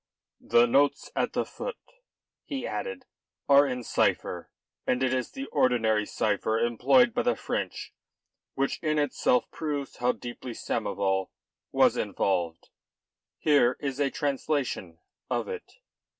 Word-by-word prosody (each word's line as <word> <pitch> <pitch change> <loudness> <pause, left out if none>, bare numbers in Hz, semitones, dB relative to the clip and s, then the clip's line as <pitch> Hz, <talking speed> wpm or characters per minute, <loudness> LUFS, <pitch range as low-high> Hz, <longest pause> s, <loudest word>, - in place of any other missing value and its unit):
"The 120 - +5
notes 140 +4 +2
at - - 0
the - - 0
foot," - - -6 0.7
he 270 -3 -4
added, 485 0 -4 0.4
"are 140 0 +7
in 125 -2 -3
cipher, - - 0 0.4
and 125 +1 +1
it 130 0 +2
is 130 -1 -1
the 270 0 -6
ordinary 110 -4 +2
cipher 110 +1 0
employed 220 - +4
by - - +1
the 120 - +1
French, - - -4 0.6
which 135 0 0
in 155 -2 0
itself 135 -3 +2
proves 145 -3 -4
how 125 +1 +2
deeply 120 0 -7
Samoval 100 -4 -1 0.4
was - - +4
involved. 85 -4 -1 0.7
Here 140 -5 +3
is 140 -1 -3
a 140 -1 +2
translation 140 - -2 0.3
of - - -1
it." 465 -2 -7
130 Hz, 130 wpm, -28 LUFS, 115-145 Hz, 0.7 s, are